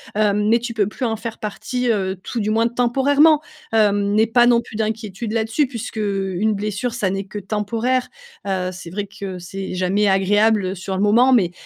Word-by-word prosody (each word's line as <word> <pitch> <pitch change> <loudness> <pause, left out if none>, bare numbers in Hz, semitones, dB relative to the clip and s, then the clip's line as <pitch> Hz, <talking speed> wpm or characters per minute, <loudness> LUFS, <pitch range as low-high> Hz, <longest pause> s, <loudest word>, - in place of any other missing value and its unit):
hem, 210 0 +2
mais 235 - +4
tu 235 0 -5
peux 205 -3 +1
plus 245 +4 -4
en 220 -1 -1
faire 225 0 -6
partie, 245 +4 -3
heu, 190 -3 -1
tout 240 - -4
du 215 0 0
moins 225 +2 +2
temporairement, 275 +6 +3 0.3
hem, 205 -2 +2
n'aie 220 +1 +4
pas 240 +2 +4
non 235 -1 +4
plus 215 - -10
d'inquiétude 220 0 -3
là-dessus 225 +5 +1
puisqu'une 210 -4 -2
blessure, 210 +3 -3
ça 210 -6 -1
n'est 195 +1 -3
que 200 +2 -8
temporaire, 225 +5 -1 0.4
heu, 185 -2 -1
c'est 175 -2 -9
vrai 205 +2 -4
que 195 -2 -7
c'est 190 +2 -6
jamais 190 +3 +1
agréable, 205 +1 +3
heu, 190 - -3
sur 190 +1 -5
le 190 - 0
moment. 240 +5 +5
Mais 190 -8 +3
210 Hz, 195 wpm, -20 LUFS, 195-235 Hz, 0.4 s, moment